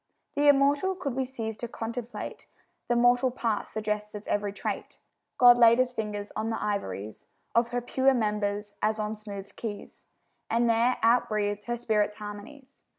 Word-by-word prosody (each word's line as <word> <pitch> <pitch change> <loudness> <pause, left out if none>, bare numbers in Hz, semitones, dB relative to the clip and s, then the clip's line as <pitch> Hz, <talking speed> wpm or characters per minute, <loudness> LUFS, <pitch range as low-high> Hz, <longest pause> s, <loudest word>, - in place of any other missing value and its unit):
The 290 0 +2
immortal 285 +6 +4
could 290 -8 -3
we 265 +1 -1
cease 225 -4 -5
to 240 - -4
contemplate, 230 +1 -6 0.4
The 240 - +2
mortal 245 +2 +4
part 230 -4 -2
suggests 210 -1 -3
its 210 - -7
every 205 -1 0
trait. 200 - -5 0.4
God 245 -1 +8
laid 235 -1 +7
His 255 -1 +1
fingers 210 -3 -4
on 220 +1 -2
the 225 - -2
ivories 110 - -4 0.3
Of 235 0 +3
her 245 +1 -2
pure 265 +2 +2
members 210 -2 -1
as 215 +1 +1
on 215 0 -2
smoothèd 205 -2 -9
keys, 210 -3 -7 0.4
And 235 +1 +2
there 230 +2 +3
out 240 +1 +4
breathed 205 -1 -1
her 240 0 -2
spirit's 210 -3 0
harmonies. 220 +7 -10
225 Hz, 165 wpm, -28 LUFS, 210-245 Hz, 0.4 s, God